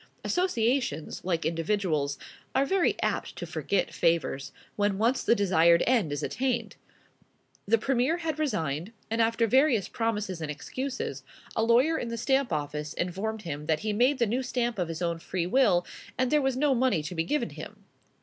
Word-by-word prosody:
Associations, 240 Hz, -, 0 dB
like 170 Hz, -3 st, -1 dB
individuals, 165 Hz, -4 st, 0 dB, 0.4 s
are 270 Hz, -, +4 dB
very 380 Hz, +4 st, +1 dB
apt -, -, -1 dB
to -, -, -5 dB
forget 200 Hz, -2 st, -1 dB
favors, 165 Hz, -5 st, 0 dB, 0.2 s
when 205 Hz, -1 st, +1 dB
once 235 Hz, +5 st, +1 dB
the 230 Hz, -, +4 dB
desired 170 Hz, -4 st, +4 dB
end 230 Hz, -, +2 dB
is 145 Hz, +1 st, -3 dB
attained. 240 Hz, -4 st, -1 dB, 0.9 s
The 230 Hz, +3 st, +4 dB
Premier 265 Hz, +7 st, +1 dB
had 320 Hz, -3 st, -3 dB
resigned; 165 Hz, -, -2 dB, 0.2 s
and, 225 Hz, +1 st, +1 dB
after 230 Hz, +1 st, +2 dB
various 245 Hz, -4 st, +3 dB
promises 210 Hz, -6 st, -2 dB
and 155 Hz, -, -3 dB
excuses, 245 Hz, -, -4 dB, 0.3 s
a -, -, +1 dB
lawyer 245 Hz, +8 st, +3 dB
in 240 Hz, -, -3 dB
the 230 Hz, 0 st, -4 dB
Stamp 265 Hz, +3 st, +1 dB
Office 150 Hz, 0 st, -3 dB
informed 205 Hz, +5 st, -3 dB
him 150 Hz, -3 st, -5 dB
that 155 Hz, -1 st, +1 dB
he 215 Hz, -1 st, -1 dB
made 250 Hz, +6 st, +3 dB
the 235 Hz, -, +2 dB
new 240 Hz, +5 st, 0 dB
stamp 240 Hz, -3 st, -2 dB
of 175 Hz, -, 0 dB
his 165 Hz, +1 st, -4 dB
own 170 Hz, -1 st, -1 dB
free 170 Hz, +1 st, -2 dB
will, 180 Hz, -4 st, +3 dB, 0.3 s
and 255 Hz, -1 st, +1 dB
there 300 Hz, -1 st, +4 dB
was 265 Hz, -2 st, 0 dB
no 285 Hz, 0 st, +3 dB
money 250 Hz, -10 st, +2 dB
to 155 Hz, -, -5 dB
be 165 Hz, -2 st, 0 dB
given 295 Hz, -, -1 dB
him. -, -, -10 dB
220 Hz, 180 wpm, -28 LUFS, 170-255 Hz, 0.9 s, are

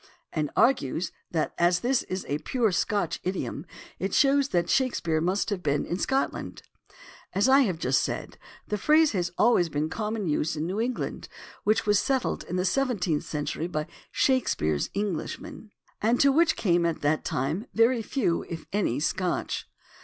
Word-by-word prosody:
and 150 Hz, -2 st, -1 dB
argues 175 Hz, -, +2 dB, 0.2 s
that 160 Hz, -3 st, -1 dB
as 175 Hz, +1 st, +3 dB
this 255 Hz, +1 st, +2 dB
is 185 Hz, +1 st, -5 dB
a 145 Hz, +1 st, -1 dB
pure 235 Hz, -, 0 dB
Scotch 205 Hz, +2 st, 0 dB
idiom 170 Hz, -4 st, -3 dB, 0.3 s
it 195 Hz, 0 st, -1 dB
shows 280 Hz, -1 st, +4 dB
that 175 Hz, -8 st, 0 dB
Shakespeare 170 Hz, -12 st, +1 dB
must 190 Hz, +6 st, 0 dB
have 195 Hz, -3 st, -2 dB
been 145 Hz, -3 st, 0 dB
in 175 Hz, -, -3 dB
Scotland. 270 Hz, +5 st, -2 dB, 0.7 s
As 200 Hz, +5 st, +3 dB
I 270 Hz, +1 st, +6 dB
have 200 Hz, -11 st, +2 dB
just 135 Hz, -4 st, +2 dB
said, -, -, -4 dB, 0.3 s
the 210 Hz, -, -2 dB
phrase 310 Hz, +5 st, +4 dB
has 180 Hz, -4 st, -1 dB
always 215 Hz, -7 st, +4 dB
been 150 Hz, 0 st, -1 dB
in 155 Hz, -, -2 dB
common 215 Hz, +2 st, -3 dB
use 155 Hz, 0 st, 0 dB
in 155 Hz, +1 st, -2 dB
New 190 Hz, +5 st, -2 dB
England, 245 Hz, +1 st, -3 dB, 0.4 s
which 215 Hz, +1 st, +2 dB
was 205 Hz, -1 st, +4 dB
settled 265 Hz, -2 st, 0 dB
in 180 Hz, -, -4 dB
the 180 Hz, 0 st, 0 dB
seventeenth 195 Hz, -, 0 dB
century 150 Hz, +2 st, -3 dB
by 155 Hz, -3 st, -2 dB, 0.3 s
Shakespeare's 80 Hz, -, +1 dB
Englishmen, 210 Hz, -, -4 dB, 0.3 s
and 230 Hz, +3 st, +2 dB
to 280 Hz, -, +6 dB
which 330 Hz, +4 st, +3 dB
came 175 Hz, -4 st, +2 dB
at 170 Hz, -1 st, -1 dB
that 150 Hz, +1 st, +1 dB
time 155 Hz, -, -2 dB
very 230 Hz, +1 st, +4 dB
few, 210 Hz, -6 st, 0 dB
if 165 Hz, -2 st, -6 dB
any, 185 Hz, -, +1 dB
Scotch. 180 Hz, +3 st, -1 dB
190 Hz, 170 wpm, -27 LUFS, 160-240 Hz, 0.7 s, I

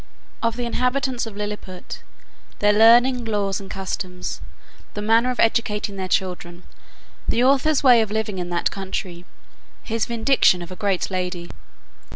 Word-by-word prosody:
Of 230 Hz, -1 st, 0 dB
the 245 Hz, 0 st, -3 dB
inhabitants 250 Hz, 0 st, -1 dB
of 205 Hz, -2 st, -9 dB
Lilliput; 205 Hz, -3 st, -6 dB, 0.6 s
their 205 Hz, 0 st, +3 dB
learning, 240 Hz, +3 st, +5 dB
laws, 205 Hz, -3 st, -1 dB
and 195 Hz, -, -10 dB
customs; 185 Hz, -1 st, -5 dB, 0.5 s
the 210 Hz, -, -3 dB
manner 225 Hz, +3 st, +3 dB
of 250 Hz, -, -3 dB
educating 210 Hz, -2 st, +1 dB
their 190 Hz, -1 st, -4 dB
children. 180 Hz, -1 st, -2 dB, 0.7 s
The 240 Hz, -, +2 dB
author's 275 Hz, +3 st, +3 dB
way 245 Hz, -4 st, +7 dB
of 220 Hz, -, -1 dB
living 210 Hz, -2 st, -2 dB
in 175 Hz, -1 st, -4 dB
that 175 Hz, -1 st, 0 dB
country. 185 Hz, -2 st, -5 dB, 0.6 s
His 225 Hz, -1 st, -2 dB
vindication 230 Hz, -6 st, +3 dB
of 175 Hz, -, -11 dB
a -, -, -6 dB
great 195 Hz, -1 st, -1 dB
lady. 180 Hz, -2 st, -4 dB
210 Hz, 150 wpm, -22 LUFS, 185-235 Hz, 0.7 s, way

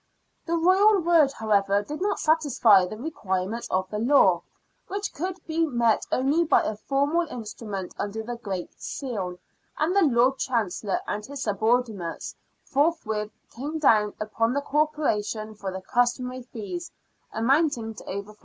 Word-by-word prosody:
The 335 Hz, +1 st, +1 dB
Royal 385 Hz, +5 st, +5 dB
word, 330 Hz, -5 st, +4 dB
however, 205 Hz, -3 st, +1 dB
did 300 Hz, -, -7 dB
not 410 Hz, +1 st, 0 dB
satisfy 260 Hz, -, +4 dB
the 215 Hz, -, -7 dB
requirements 215 Hz, -6 st, -3 dB
of 185 Hz, 0 st, 0 dB
the 210 Hz, -, -2 dB
law, 275 Hz, +6 st, +4 dB, 0.5 s
which 400 Hz, +1 st, -4 dB
could 365 Hz, +4 st, -3 dB
be 325 Hz, 0 st, 0 dB
met 235 Hz, -7 st, +1 dB
only 280 Hz, +6 st, +2 dB
by 325 Hz, -, +3 dB
a 215 Hz, -, -2 dB
formal 285 Hz, +9 st, 0 dB
instrument 210 Hz, -, -6 dB
under 215 Hz, +2 st, -3 dB
the 240 Hz, +2 st, -5 dB
Great 195 Hz, -6 st, -6 dB
Seal, 200 Hz, -10 st, -4 dB, 0.4 s
and 325 Hz, +5 st, +1 dB
the 400 Hz, -, +5 dB
Lord 260 Hz, -3 st, +3 dB
Chancellor 210 Hz, -5 st, -1 dB
and 210 Hz, 0 st, -3 dB
his 280 Hz, +3 st, -6 dB
subordinates 215 Hz, -4 st, -1 dB, 0.3 s
forthwith 240 Hz, -8 st, 0 dB, 0.2 s
came 290 Hz, +6 st, -4 dB
down 215 Hz, -8 st, +3 dB
upon 225 Hz, +2 st, 0 dB
the 285 Hz, -, +1 dB
Corporation 280 Hz, -8 st, -1 dB
for 200 Hz, -2 st, -5 dB
the^^customary 245 Hz, +5 st, -1 dB
fees, 260 Hz, -, -6 dB, 0.4 s
amounting 245 Hz, -1 st, +1 dB
to -, -, -11 dB
over 200 Hz, +2 st, -6 dB
£14. -, -, -27 dB
240 Hz, 145 wpm, -26 LUFS, 210-300 Hz, 0.5 s, Royal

